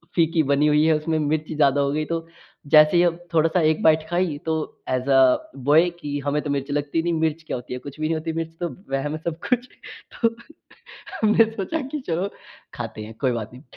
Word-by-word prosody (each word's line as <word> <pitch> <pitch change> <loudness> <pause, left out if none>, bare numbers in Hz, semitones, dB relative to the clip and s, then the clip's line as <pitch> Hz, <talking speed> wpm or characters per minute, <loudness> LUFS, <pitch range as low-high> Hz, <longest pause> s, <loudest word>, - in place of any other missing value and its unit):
फीकी 165 -1 +3
बनी 140 +2 +3
हुई 150 +1 +4
है 160 - +4
उसमें 160 +1 -1
मिर्ची 155 +1 -1
ज़्यादा 145 -2 +3
हो 140 0 +1
गयी 155 +1 -1
तो 165 +1 -3 0.5
जैसे 155 +2 +7
ही 175 - +5 0.3
थोड़ा-सा 165 +2 +3
1 155 0 +2
बाइट 160 0 +4
खाई 175 -4 0
तो 160 - 0 0.4
ऐज़ 130 +1 -1
अ, 130 -1 +4
बॉय 150 +6 +4
की 145 -3 -4
हमें 145 +1 0
तो 145 - -4
मिर्च 140 0 -2
लगती 145 +2 -1
नहीं 170 0 0
मिर्च 160 0 -1
क्या - - -2
होती 125 +1 -8
है? 125 - -4
कुछ 140 +3 -10
भी 155 - -1
नहीं 165 - 0
होती 160 +1 -3
मिर्च 165 0 -4
तो 175 - -1 0.2
वहम 135 +2 -1
है - - -4
सब 165 -1 -2
कुछ। 250 0 +1 0.6
तो 230 - +6 0.9
हमने 220 +1 +5
सोचा 225 +10 -3
कि 300 +2 -4
चलो 175 +4 -1 0.5
खाते 110 - -6
हैं 110 +1 -9
कोई 130 - +2
बात 115 -1 -4
नहीं। 125 +3 -13
155 Hz, 220 wpm, -23 LUFS, 145-165 Hz, 0.9 s, जैसे